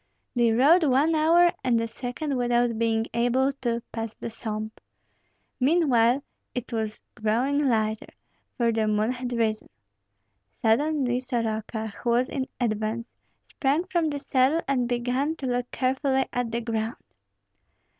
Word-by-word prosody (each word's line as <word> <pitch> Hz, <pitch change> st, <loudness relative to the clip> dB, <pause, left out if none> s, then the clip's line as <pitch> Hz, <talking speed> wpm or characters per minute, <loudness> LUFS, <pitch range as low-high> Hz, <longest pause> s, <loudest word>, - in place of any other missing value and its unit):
They 240 Hz, -2 st, +3 dB
rode 290 Hz, +10 st, +5 dB
one 290 Hz, +3 st, +3 dB
hour 335 Hz, +3 st, +5 dB
and 240 Hz, -2 st, +2 dB
a 230 Hz, -, -1 dB
second 255 Hz, +5 st, -4 dB
without 240 Hz, -2 st, +1 dB
being 225 Hz, -1 st, +1 dB
able 245 Hz, +3 st, +2 dB
to 235 Hz, -2 st, -1 dB
pass 225 Hz, -1 st, -5 dB
the 235 Hz, -, -6 dB
swamp. 220 Hz, -1 st, -5 dB, 0.8 s
Meanwhile 265 Hz, -4 st, +3 dB, 0.3 s
it 250 Hz, -1 st, -4 dB
was 220 Hz, -1 st, -3 dB
growing 260 Hz, +7 st, +1 dB
lighter, 220 Hz, -2 st, 0 dB, 0.5 s
for 235 Hz, -2 st, +2 dB
the 220 Hz, -1 st, 0 dB
moon 215 Hz, +2 st, +1 dB
had 250 Hz, 0 st, -4 dB
risen. 225 Hz, -2 st, -1 dB, 0.9 s
Suddenly 250 Hz, +2 st, +2 dB
Soroka, 220 Hz, -3 st, -3 dB
who 240 Hz, -, -1 dB
was 245 Hz, +2 st, +2 dB
in 265 Hz, -1 st, -3 dB
advance, 220 Hz, 0 st, -2 dB, 0.3 s
sprang 285 Hz, +5 st, 0 dB
from 345 Hz, -4 st, 0 dB
the 290 Hz, -, -3 dB
saddle 275 Hz, +3 st, +2 dB
and 250 Hz, -3 st, +1 dB
began 250 Hz, +5 st, 0 dB
to 280 Hz, -, -7 dB
look 245 Hz, -1 st, -1 dB
carefully 265 Hz, +1 st, +1 dB
at 245 Hz, -2 st, -1 dB
the 235 Hz, +1 st, -1 dB
ground. 225 Hz, 0 st, -2 dB
245 Hz, 140 wpm, -26 LUFS, 225-270 Hz, 0.9 s, rode